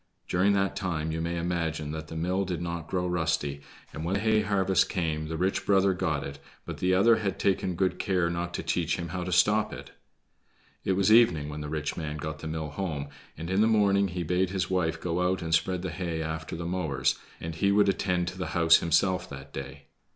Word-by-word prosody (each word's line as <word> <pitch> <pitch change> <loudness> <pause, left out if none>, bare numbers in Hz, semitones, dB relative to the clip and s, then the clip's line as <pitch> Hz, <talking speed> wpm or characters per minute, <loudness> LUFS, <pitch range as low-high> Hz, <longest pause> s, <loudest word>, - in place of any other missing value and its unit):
During 95 +3 +3
that 100 -1 +1
time 85 -5 -2
you 80 +1 -2
may 85 +1 -2
imagine 85 -3 -2
that 80 0 -6
the 80 - -8
mill 90 +4 0
did 90 -3 -3
not 85 -2 -4
grow 90 -1 -1
rusty, 80 -5 -1 0.3
and 80 - -5
when 90 +4 0
hay 110 +1 +2
harvest 95 -2 +2
came 80 -4 -1
the 80 0 -4
rich 95 +3 0
brother 95 -1 +3
got 75 -5 -1
it, 70 0 -7 0.3
but - - -6
the 90 0 +2
other 115 +4 +5
had 100 -3 -2
taken 95 -2 0
good 95 +1 0
care 90 -4 +1
not 85 +1 -2
to - - -3
teach 85 -2 0
him 85 -1 -5
how 90 +1 -3
to 90 - -4
stop 105 +5 +3
it. - - -9 0.9
It 95 - +1
was 100 +3 +4
evening 85 -11 +5
when 75 0 -6
the 75 - -5
rich 75 -1 -2
man 75 -2 -4
got 75 +1 -5
the 80 - -6
mill 80 -1 -4
home, 75 -6 -3 0.3
and 80 - -5
in 95 +3 +2
the 110 - +5
morning 100 -3 +3
he 90 -1 -3
bade 90 +3 +1
his 95 -1 -2
wife 85 -3 0
go 85 +1 -1
out 90 0 0
and 80 0 -2
spread 90 +2 +1
the 95 - -3
hay 85 -2 -3
after 80 0 -4
the 85 0 -5
mowers, 85 -6 0 0.2
and 80 0 -5
he 100 +5 +1
would 100 0 +4
attend 90 -2 +1
to 90 - -10
the 95 - -2
house 85 -1 +7
himself 90 +2 +1
that 70 -1 -10
day. 70 +1 -7
90 Hz, 225 wpm, -28 LUFS, 80-95 Hz, 0.9 s, house